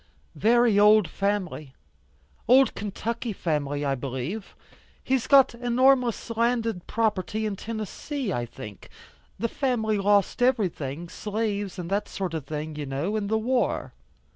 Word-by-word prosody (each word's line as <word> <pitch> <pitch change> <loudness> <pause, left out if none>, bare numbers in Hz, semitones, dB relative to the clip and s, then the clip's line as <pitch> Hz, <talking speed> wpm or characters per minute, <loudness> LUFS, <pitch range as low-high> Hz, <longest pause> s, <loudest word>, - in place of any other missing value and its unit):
"Very 230 -2 +4
old 210 -2 +6
family, 185 -7 -2 0.7
old 260 +3 +6
Kentucky 225 +3 -4
family 145 -5 -2
I 140 - +1
believe. 135 - -5 0.5
He's 260 -1 0
got 275 -3 +6
enormous 245 -1 +2
landed 230 -5 0
property 215 -1 -1
in 210 -2 -2
Tennessee, 225 +4 -4
I 120 0 -2
think. 105 -3 -10 0.5
The 230 - 0
family 220 -5 0
lost 200 +3 +2
everything, 175 - 0
slaves 205 0 -3
and 175 -2 -5
that 205 +1 0
sort 185 -4 -4
of 160 -4 -4
thing, 155 0 -5
you 145 -2 -4
know, 145 +10 -2
in 210 -2 -1
the 220 +2 +1
war. 245 +3 0
210 Hz, 135 wpm, -26 LUFS, 170-235 Hz, 0.7 s, old